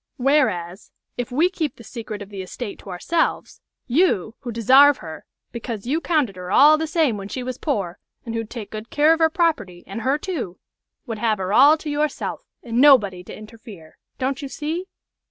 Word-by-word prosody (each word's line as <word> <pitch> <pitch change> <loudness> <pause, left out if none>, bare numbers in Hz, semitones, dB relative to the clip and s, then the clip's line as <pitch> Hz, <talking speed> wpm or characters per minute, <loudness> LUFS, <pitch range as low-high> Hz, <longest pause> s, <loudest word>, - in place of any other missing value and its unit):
Whereas, 245 - 0 0.3
if 245 +1 -4
we 305 +8 +3
keep 315 -7 -3
the 230 - -14
secret 215 -3 -7
of 200 - -14
the 200 -2 -6
estate 200 +3 -7
to - - -12
ourselves, 325 - -2 0.2
you, 240 - +1
who 245 - -6
desarve 265 +6 +6
her, 160 -1 -10 0.3
because 230 -3 -6
you 300 +7 0
'counted 290 - 0
her 180 0 -7
all 295 +7 +7
the 320 +1 -2
same 310 - +1
when 195 -1 -7
she 255 +4 -5
was 255 0 -5
poor, 200 - -2 0.3
and 230 - -5
who'd 225 -1 -4
take 230 -4 -8
good 215 +2 -7
care 300 +2 +4
of 325 - -2
her 320 -1 +4
property, 305 - -1
and 200 +4 -6
her, 265 +5 +1
too 300 - -5 0.5
would 225 -4 -5
have 220 -2 +1
her 190 +1 -3
all 285 +7 +7
to 310 - -10
yourself, 295 0 -2 0.2
and 235 0 0
nobody 210 -11 +5
to - - -10
interfere. 215 -6 -13 0.2
Don't 270 +1 -2
you 280 - -5
see?" 315 +7 -4
245 Hz, 195 wpm, -22 LUFS, 205-295 Hz, 0.5 s, all